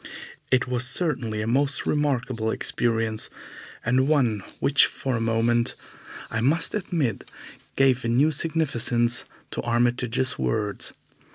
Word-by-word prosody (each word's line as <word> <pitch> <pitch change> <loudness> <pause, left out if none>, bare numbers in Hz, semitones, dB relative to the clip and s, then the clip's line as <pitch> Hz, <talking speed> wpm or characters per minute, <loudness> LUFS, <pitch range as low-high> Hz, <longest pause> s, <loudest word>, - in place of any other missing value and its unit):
It 130 -1 +2
was 125 -1 +1
certainly 125 -8 0
a - - -4
most 140 +4 +1
remarkable 130 -6 0
experience, 115 -1 0 0.6
and 130 +3 +2
one 130 -9 +2 0.2
which 140 0 +5
for 130 -2 -3
a 115 - -2
moment, 115 +1 +1 0.6
I 115 - -1
must 150 +7 +1
admit, 165 - -2 0.5
gave 130 -2 +3
a - - -2
new 135 +7 +3
significance 125 -7 0 0.3
to - - -3
Armitage's 120 +1 0
words. 105 -2 -1
125 Hz, 120 wpm, -25 LUFS, 115-140 Hz, 0.6 s, which